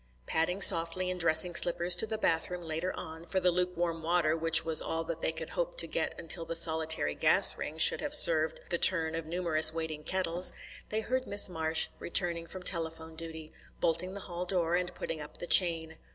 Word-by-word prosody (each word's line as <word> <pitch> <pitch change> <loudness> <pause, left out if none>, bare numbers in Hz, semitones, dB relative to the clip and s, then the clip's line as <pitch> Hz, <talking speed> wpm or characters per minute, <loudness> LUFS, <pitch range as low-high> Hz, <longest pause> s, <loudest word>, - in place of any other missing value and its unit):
Padding 180 - -3
softly 170 +2 +2
in 180 - -6
dressing 165 +1 +3
slippers 175 +1 +3
to 220 - +1
the 220 0 -5
bathroom 175 -1 -2
later 165 +3 -5
on, 160 -1 -10
for 190 +2 -3
the 180 -1 +1
lukewarm 175 -2 -3
water 165 -1 -1
which 165 0 +3
was 160 -1 +6
all 165 0 -5
that 165 0 -8
they - - -1
could 160 0 -9
hope - - -5
to - - +3
get - - -5
until 170 0 0
the 165 0 -7
solitary 160 - +2
gas - - +2
ring 155 - -8
should - - +4
have 295 0 +1
served 160 - +3
the 170 - -1
turn 160 -3 +2
of 165 -1 -7
numerous 160 -2 +5
waiting 160 -2 -7
kettles, 180 -1 -2 0.4
they 215 +1 -3
heard 255 +3 -4
Miss 205 -1 +5
Marsh 160 -2 -1
returning 170 -1 -2
from 185 +1 -11
telephone 165 -2 -1
duty, 160 -1 -10 0.3
bolting 175 +3 -3
the 200 - -8
hall 175 -1 -8
door, 175 -3 -1
and 180 0 -2
putting 160 -2 -7
up 150 - -12
the - - -8
chain. 165 -3 +1
165 Hz, 200 wpm, -28 LUFS, 160-180 Hz, 0.4 s, was